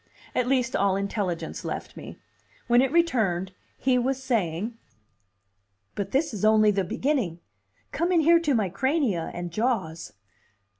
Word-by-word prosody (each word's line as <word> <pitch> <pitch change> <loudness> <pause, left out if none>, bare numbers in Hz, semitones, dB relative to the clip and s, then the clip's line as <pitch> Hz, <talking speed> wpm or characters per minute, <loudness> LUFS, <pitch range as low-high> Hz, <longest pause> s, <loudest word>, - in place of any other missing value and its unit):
At 250 - 0
least, 255 -2 +1
all 200 -1 +2
intelligence 195 -3 -3
left - - -5
me. - - -9 0.5
When 240 +1 +4
it 265 0 +1
returned, 220 - +1 0.3
he 255 -1 +2
was 260 +2 0
saying. 215 -2 -1 1.2
"But 200 -1 -4
this 280 +3 0
is 210 - -5
only 215 -1 +5
the 195 -1 0
beginning. 210 - -1 0.5
Come 340 +4 0
in 340 -2 +4
here 335 +2 +5
to 300 -5 +1
my 215 -4 +1
crania 245 - 0
and 175 0 -5
jaws." 195 -7 -2
225 Hz, 145 wpm, -26 LUFS, 190-265 Hz, 1.2 s, only